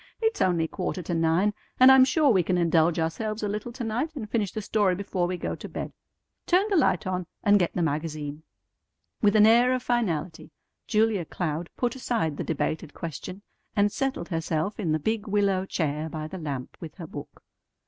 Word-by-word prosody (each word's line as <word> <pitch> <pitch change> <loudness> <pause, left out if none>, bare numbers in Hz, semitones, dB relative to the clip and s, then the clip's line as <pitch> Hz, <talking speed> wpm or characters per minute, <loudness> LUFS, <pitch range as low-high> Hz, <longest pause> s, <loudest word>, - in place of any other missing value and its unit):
"It's 445 -1 0
only 170 -3 +2
quarter 180 +1 -4
to 175 - -3
nine, 165 +5 +2 0.3
and 255 +1 +9
I'm 265 -1 +8
sure 285 +1 +3
we 190 -5 +4
can 180 +2 0
indulge 165 -1 +3
ourselves 215 +7 -2
a - - +1
little 210 +3 -4
to 250 0 -5
night, 245 +9 -2
and 235 -7 -5
finish 210 -3 -1
the - - -4
story 200 -3 +2
before 190 -2 -1
we 180 0 -3
go - - -3
to - - -8
bed. - - -5 0.5
Turn 370 +4 +3
the - - +3
light 245 - +2
on, 185 -2 -2 0.2
and 205 -1 +5
get 175 - 0
the 175 - +1
magazine." 150 -1 -3 0.8
With 205 0 +4
an 210 0 +7
air 240 +3 +5
of 255 - -4
finality 180 -9 -1 0.4
Julia 215 -4 +2
Cloud 165 0 -3
put 245 -1 0
aside 225 - -1
the - - -2
debated 160 0 -3
question, 180 +4 -7 0.3
and 205 0 +3
settled 270 -9 -2
herself 165 +3 -2
in 175 -7 0
the 155 - +2
big 220 +7 -2
willow 200 -2 +1
chair 155 -2 -2
by 155 -1 -5
the 185 +4 -7
lamp 140 -5 -5
with 165 -3 -8
her 175 - -8
book. 145 -2 -10
185 Hz, 200 wpm, -26 LUFS, 165-220 Hz, 0.8 s, and